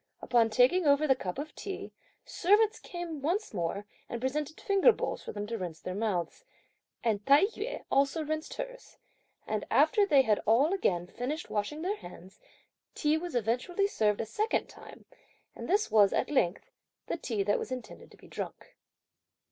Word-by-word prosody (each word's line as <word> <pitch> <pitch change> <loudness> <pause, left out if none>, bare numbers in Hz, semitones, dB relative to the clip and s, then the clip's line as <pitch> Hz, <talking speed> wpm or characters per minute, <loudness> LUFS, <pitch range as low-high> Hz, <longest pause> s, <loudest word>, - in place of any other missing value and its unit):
Upon 235 -2 +3
taking 255 +10 +4
over 285 +2 +4
the 275 - +5
cup 185 -8 -5
of 295 +2 -5
tea, 395 -1 -6 0.3
servants 425 +4 +3
came 345 -4 -6
once 355 - -1
more 185 +2 -2 0.2
and 235 - -4
presented 290 +4 -2
finger 400 +4 +5
bowls - - -3
for - - -7
them 205 0 -4
to 225 +1 -4
rinse 170 -4 -5
their 185 - -5
mouths, 200 - -2 0.6
and 215 -3 0
Tai 285 +6 +7
yü 440 +3 -5
also 280 +4 +2
rinsed 310 +1 -4
hers; - - -8 0.5
and - - -2
after 430 -4 +4
they 280 -7 +5
had 215 -4 +2
all 265 - +4
again 175 - 0
finished 255 - -5
washing 220 +10 -2
their 400 +4 -1
hands, 180 - -13 0.6
tea 300 0 +2
was 335 -2 -4
eventually 245 - 0
served 215 - +1
a - - -3
second 425 - 0
time, - - -14 0.5
and - - -7
this 415 +4 +2
was, 205 -3 +5
at - - 0
length, 190 -10 0 0.3
the - - -2
tea 225 -10 -2
that 205 +1 +1
was - - -6
intended 255 -1 -7
to - - -18
be - - -17
drunk. - - -7
275 Hz, 175 wpm, -30 LUFS, 215-355 Hz, 0.6 s, Tai